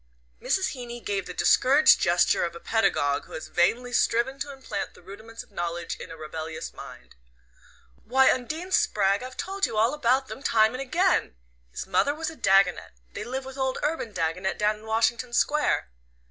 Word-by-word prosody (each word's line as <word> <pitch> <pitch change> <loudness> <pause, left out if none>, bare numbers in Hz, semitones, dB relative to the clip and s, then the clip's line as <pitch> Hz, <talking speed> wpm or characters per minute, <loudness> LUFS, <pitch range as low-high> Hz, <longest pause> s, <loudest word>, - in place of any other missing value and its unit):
Mrs. 380 - +1
Heeny 240 -2 -7
gave 200 -4 -3
the 180 - -6
discouraged 280 - +5
gesture 175 +1 +3
of 170 0 -3
a - - -8
pedagogue 145 -10 +1
who - - -14
has 155 - -7
vainly 245 +8 +1
striven 250 +5 +1
to 285 - -4
implant 270 -1 -6
the - - -16
rudiments 220 +5 -10
of - - -26
knowledge 175 -2 -4
in - - -9
a 165 - -9
rebellious 160 +1 -6
mind. - - -12 0.9
"Why, 265 +3 +4
Undine 315 +9 -4
Spragg, 200 - +2
I've 255 +1 -8
told 390 +1 -1
you 215 - -5
all 225 +5 +3
about 265 -2 +1
them 265 - -8
time 220 -5 +3
and 255 - -4
again! 340 - +1 0.3
His - - -6
mother 195 +10 +1
was 320 +1 -4
a - - -12
Dagonet. 195 - +2 0.2
They - - -5
live 260 +2 -5
with 265 +1 -9
old 265 -1 0
Urban 295 -6 -2
Dagonet 180 +1 -2
down 210 0 +1
in 215 - -15
Washington 230 +2 0
Square." 290 - +1
230 Hz, 185 wpm, -26 LUFS, 190-265 Hz, 0.9 s, discouraged